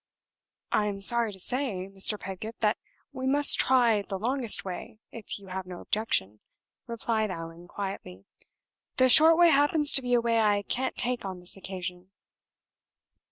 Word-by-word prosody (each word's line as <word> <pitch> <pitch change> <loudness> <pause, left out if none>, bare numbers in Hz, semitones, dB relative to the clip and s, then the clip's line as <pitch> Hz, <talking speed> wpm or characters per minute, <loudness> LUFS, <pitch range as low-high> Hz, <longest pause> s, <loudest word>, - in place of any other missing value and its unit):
"I 210 - +1
am 200 -1 -5
sorry 235 +2 +3
to 195 - -12
say, 210 -3 +2
Mr. 195 +2 -1
Pedgift, 195 +5 -9
that 210 -1 0 0.3
we 260 -1 -5
must 285 +2 +5
try 240 -5 +3
the 195 -1 -6
longest 240 +1 0
way, 185 +3 -8
if 225 -3 -8
you 195 -2 -15
have 185 0 -6
no 180 -1 -9
objection," 105 - -2 0.5
replied 225 -2 -2
Allan, 165 -1 -9
quietly. 190 - -8 0.7
"The 255 0 +4
short 320 +5 +7
way 345 -1 +5
happens 290 +1 +3
to 270 - +5
be 245 -1 0
a - - +3
way 230 -1 0
I 205 -2 +1
can't 260 +5 -3
take 245 -1 -2
on 190 -2 -7
this 180 0 -4
occasion." 185 -1 -8
210 Hz, 160 wpm, -26 LUFS, 190-250 Hz, 0.7 s, short